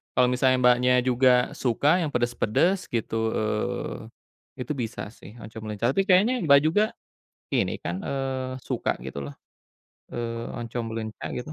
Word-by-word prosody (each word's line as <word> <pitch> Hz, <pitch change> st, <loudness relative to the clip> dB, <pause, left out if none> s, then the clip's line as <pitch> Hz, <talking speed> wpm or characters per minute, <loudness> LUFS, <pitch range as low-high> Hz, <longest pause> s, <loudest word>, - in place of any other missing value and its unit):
Kalo 125 Hz, -, +5 dB
misalnya 130 Hz, 0 st, +3 dB
Mbaknya 125 Hz, +1 st, +5 dB
juga 125 Hz, 0 st, +3 dB
suka 140 Hz, +8 st, +2 dB
yang 155 Hz, -, -1 dB
pedes-pedes 120 Hz, -, +1 dB
gitu, 115 Hz, -1 st, -1 dB
eee, 105 Hz, 0 st, -2 dB, 0.7 s
itu 135 Hz, -, -6 dB
bisa, 115 Hz, -4 st, -4 dB
sih, 115 Hz, -1 st, -14 dB
oncom 110 Hz, 0 st, -9 dB
leunca 110 Hz, +4 st, 0 dB
tapi 195 Hz, -, +2 dB
kayaknya 210 Hz, +7 st, +4 dB
Mbak, 140 Hz, -2 st, +7 dB
juga 175 Hz, +7 st, +3 dB, 0.7 s
ini, -, -, +1 dB
kan, 85 Hz, +2 st, -3 dB
eee, 130 Hz, -1 st, -2 dB
suka -, -, -1 dB
gitu, 70 Hz, -, -6 dB
loh, 70 Hz, -, -8 dB, 0.8 s
eee, 115 Hz, -1 st, -4 dB
oncom 120 Hz, 0 st, -4 dB
leunca 110 Hz, -1 st, -5 dB
gitu? 140 Hz, +5 st, -5 dB
125 Hz, 145 wpm, -26 LUFS, 115-135 Hz, 0.8 s, Mbak